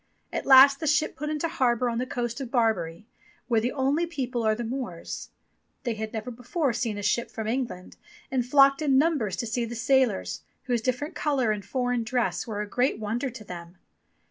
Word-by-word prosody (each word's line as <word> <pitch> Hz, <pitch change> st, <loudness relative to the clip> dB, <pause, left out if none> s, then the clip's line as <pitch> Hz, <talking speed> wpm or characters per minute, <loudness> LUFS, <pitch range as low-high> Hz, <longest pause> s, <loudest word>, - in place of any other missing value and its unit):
At -, -, -3 dB
last 275 Hz, +1 st, +8 dB
the 315 Hz, -, -3 dB
ship 305 Hz, +1 st, +2 dB
put 300 Hz, +3 st, -4 dB
into 305 Hz, +2 st, -1 dB
harbour 250 Hz, -5 st, +1 dB
on 235 Hz, -1 st, -1 dB
the 255 Hz, -, -2 dB
coast 240 Hz, +1 st, -3 dB
of 260 Hz, -, -5 dB
Barbary, 215 Hz, -8 st, 0 dB, 0.4 s
where 230 Hz, -3 st, +2 dB
the 245 Hz, +3 st, 0 dB
only 285 Hz, +5 st, +1 dB
people 255 Hz, -7 st, -3 dB
are 220 Hz, -1 st, +2 dB
the 240 Hz, -, -4 dB
Moors. 230 Hz, -8 st, -5 dB, 0.5 s
They 240 Hz, -4 st, -1 dB
had 220 Hz, 0 st, -5 dB
never 225 Hz, +2 st, -5 dB
before 250 Hz, +4 st, -1 dB
seen 230 Hz, -2 st, -2 dB
a 205 Hz, -, -5 dB
ship 235 Hz, +4 st, +1 dB
from 220 Hz, -, -5 dB
England, 230 Hz, -6 st, -3 dB, 0.3 s
and 260 Hz, -2 st, +1 dB
flocked 275 Hz, +3 st, +5 dB
in 275 Hz, -3 st, +3 dB
numbers 280 Hz, -, +2 dB
to 240 Hz, -, -3 dB
see 235 Hz, +2 st, -1 dB
the 235 Hz, +1 st, -5 dB
sailors, 250 Hz, -3 st, +1 dB, 0.2 s
whose 245 Hz, -3 st, 0 dB
diff^erent 255 Hz, +5 st, -2 dB
colour 270 Hz, -7 st, +1 dB
and 210 Hz, -1 st, -3 dB
foreign 245 Hz, +3 st, -1 dB
dress 245 Hz, +2 st, -1 dB
were 210 Hz, -2 st, -3 dB
a -, -, -7 dB
great 250 Hz, +5 st, +1 dB
wonder 225 Hz, +5 st, -2 dB
to 230 Hz, -3 st, -10 dB
them. 175 Hz, -2 st, -9 dB
245 Hz, 200 wpm, -27 LUFS, 220-270 Hz, 0.5 s, last